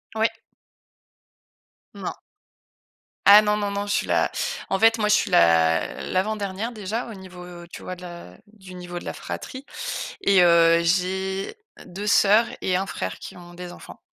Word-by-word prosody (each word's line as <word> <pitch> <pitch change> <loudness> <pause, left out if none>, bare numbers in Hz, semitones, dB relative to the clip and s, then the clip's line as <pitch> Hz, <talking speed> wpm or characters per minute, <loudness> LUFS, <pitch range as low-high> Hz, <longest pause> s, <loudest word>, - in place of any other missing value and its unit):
Ouais. 220 +1 +2 1.6
Non. - - -6 1.1
Ah 205 +1 +9
non, 210 0 +1
non, 205 -1 -2
non. 200 0 -3
Je 205 - -2
suis - - 0
la - - +1 0.4
en 195 - 0
fait, 225 +1 +5
moi 210 -1 0
je 210 - +4
suis 210 - +2
l'a 80 -1 +3
l'avant-dernière, 205 +3 -2
déjà, 215 +2 -4
au 230 - -8
niveau, 185 -2 -11
heu, 175 -1 -11
tu - - -10
vois, 185 - -6
de 180 - -15
la 170 - -10
du 190 -3 -14
niveau 175 -1 -8
de - - -13
la - - -4
fratrie 260 0 -7 0.6
et 195 -2 +4
heu, 170 -1 +5
j'ai 190 - -1 0.3
deux 200 +4 -7
sœurs 210 +2 +5 0.2
et 185 - 0
1 195 +1 -2
frère 95 - -5
qui - - -10
ont 175 0 -13
des 180 0 -8
enfants. - - -13
190 Hz, 175 wpm, -23 LUFS, 175-210 Hz, 1.6 s, Ah